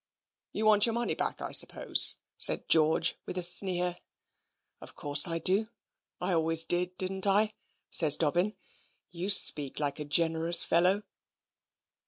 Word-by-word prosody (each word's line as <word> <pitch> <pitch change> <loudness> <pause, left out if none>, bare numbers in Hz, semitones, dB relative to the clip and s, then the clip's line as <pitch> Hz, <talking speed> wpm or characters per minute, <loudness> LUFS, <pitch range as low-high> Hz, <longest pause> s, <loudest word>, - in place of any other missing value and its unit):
"You 215 - -6
want 215 0 +3
your 230 - -5
money 240 0 -4
back, - - -7
I - - -8
suppose," - - +3 0.2
said - - +2
George, 160 +1 0
with - - -9
a 180 - -4
sneer. 180 0 +2 0.8
"Of - - -16
course 145 +1 +1
I 165 -1 -5
do 195 +6 -1 0.5
I 185 - -5
always 165 0 +3
did, 180 +2 -5
didn't 190 +1 -5
I?" 210 +2 -1 0.4
says 155 -4 +3
Dobbin. 175 +7 -3 0.6
"You 180 +3 -8
speak 150 -9 +3
like 145 -1 -6
a 150 - -8
generous 165 +2 +3
fellow." 185 +5 -1
175 Hz, 145 wpm, -25 LUFS, 160-195 Hz, 0.8 s, want